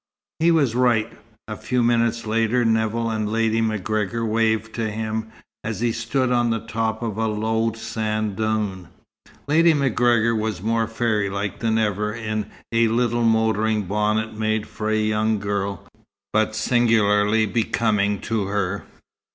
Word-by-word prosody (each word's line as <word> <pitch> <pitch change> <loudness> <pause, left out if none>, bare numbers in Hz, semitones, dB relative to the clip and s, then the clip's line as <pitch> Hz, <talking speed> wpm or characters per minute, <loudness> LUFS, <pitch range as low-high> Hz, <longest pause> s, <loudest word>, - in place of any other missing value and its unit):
He 165 +2 +4
was 150 -8 +3
right. 120 -3 +1 0.3
A 110 - -5
few 120 +4 -1
minutes 115 -1 +1
later 115 +2 +1
Nevill 115 +1 +1
and 110 -1 -2
Lady 115 0 +1
MacGregor 110 +1 -1
waved 110 0 0
to 115 -2 -2
him, 110 +1 -3 0.4
as 110 0 -4
he 120 -1 +2
stood 120 +3 -1
on 120 -1 +2
the 115 0 -2
top 110 0 -2
of 110 -3 -3
a 110 - +1
low 110 +1 0
sand 110 -2 -3
dune. 105 -4 -2 0.6
Lady 165 +2 +4
MacGregor 120 -4 +2
was 110 -3 -2
more 115 +3 0
fairylike 105 -3 -1
than 110 -1 +1
ever 105 -1 0
in 110 -2 -4 0.2
a 115 0 +3
little 120 +1 +1
motoring 110 -1 +2
bonnet 105 +3 0
made 110 0 -1
for 110 0 -5
a 110 - +2
young 110 0 +1
girl, 100 -1 -3 0.5
but 110 0 +1
singularly 110 -2 +3
becoming 105 -2 0
to 110 -3 -1
her. 100 -3 -2
110 Hz, 145 wpm, -22 LUFS, 105-115 Hz, 0.6 s, He